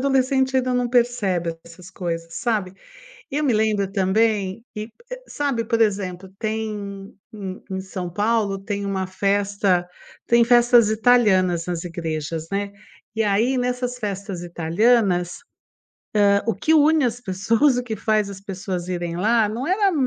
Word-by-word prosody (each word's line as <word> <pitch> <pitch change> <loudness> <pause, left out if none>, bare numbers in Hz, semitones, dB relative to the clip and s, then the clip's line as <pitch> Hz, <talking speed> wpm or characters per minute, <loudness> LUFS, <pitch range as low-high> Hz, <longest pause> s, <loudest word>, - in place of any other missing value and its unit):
adolescente 265 0 +2
ainda 255 0 +1
não 250 -1 0
percebe 215 -9 +1
essas 175 +2 -13
coisas, 165 -2 -5
sabe. 210 -6 -1 0.6
Eu 300 +2 -1
me 255 -5 +2
lembro 210 -2 +1
também 200 +1 +1
e 210 - -3 0.3
é - - -5
sabe, 275 -6 -2
por 230 -1 +1
exemplo, 190 -3 -1
tem 210 -3 -4 0.2
em 195 -3 -7
em 190 0 -3
São 190 -1 -6
Paulo 205 +1 0
tem 200 0 -4
uma 190 -1 -2
festa 195 -1 +1 0.4
tem 235 0 +5
festas 240 -2 +5
italianas 210 -7 +3
nas 175 -1 -3
igrejas, 160 -2 -4
né. 200 0 -2 0.4
E, 225 - +1
aí, 220 +6 +2
nessas 250 0 -2
festas 200 -4 -5
italianas, 175 +2 +1 0.9
hã, 200 0 +4
o 225 - +1
que 315 +10 +1
une 310 0 +4
as 245 0 -1
pessoas, 225 +7 +2
o 245 - -2
que 225 - -3
faz 215 0 +1
as 195 -1 -8
pessoas 185 -2 -5
irem 175 -2 -3
lá, 220 +3 +2
não 230 +5 -4
era, 390 +3 +2
hã - - -4
205 Hz, 150 wpm, -22 LUFS, 185-240 Hz, 0.9 s, tem